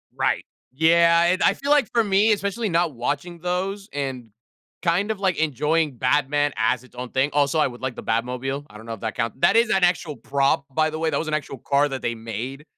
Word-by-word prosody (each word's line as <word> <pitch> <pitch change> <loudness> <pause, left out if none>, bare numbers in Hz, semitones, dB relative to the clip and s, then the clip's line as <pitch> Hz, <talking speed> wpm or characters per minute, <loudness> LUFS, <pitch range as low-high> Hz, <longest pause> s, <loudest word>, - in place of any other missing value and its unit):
Right. - - 0 0.3
Yeah. 170 +2 +4
And 180 +2 +2
I - - +5
feel 280 +1 -3
like 290 -7 +4
for 230 - +3
me, 205 +2 +3
especially 205 +2 -1
not 170 -2 +1
watching 145 +8 -3
those 190 +4 -3
and 135 -4 -4 0.5
kind 180 +4 +1
of, 215 - -4
like, 190 -3 0
enjoying 150 -1 0
Batman 145 +3 +1
as 115 +3 +1
its 130 - -20
own 125 0 -6
thing. 135 +3 0
Also, 145 +1 +2
I 150 - +4
would 120 -1 -6
like 130 -2 -3
the - - -8
Batmobile. 125 +5 -2
I 105 - -12
don't 110 - -12
know 115 - -5
if 110 - -8
that 110 -2 -4
count 115 +4 -3
That 170 - +4
is 230 0 +4
an 190 -2 +2
actual 175 -4 +1
prop, 140 0 0
by 155 +1 +1
the 155 - -5
way. 160 - +1
That 145 - 0
was 160 - -3
an 155 - -3
actual 145 -3 -3
car 140 +4 +1
that 135 -2 -5
they 120 - 0
made, 115 +5 -6
145 Hz, 235 wpm, -23 LUFS, 130-175 Hz, 0.5 s, I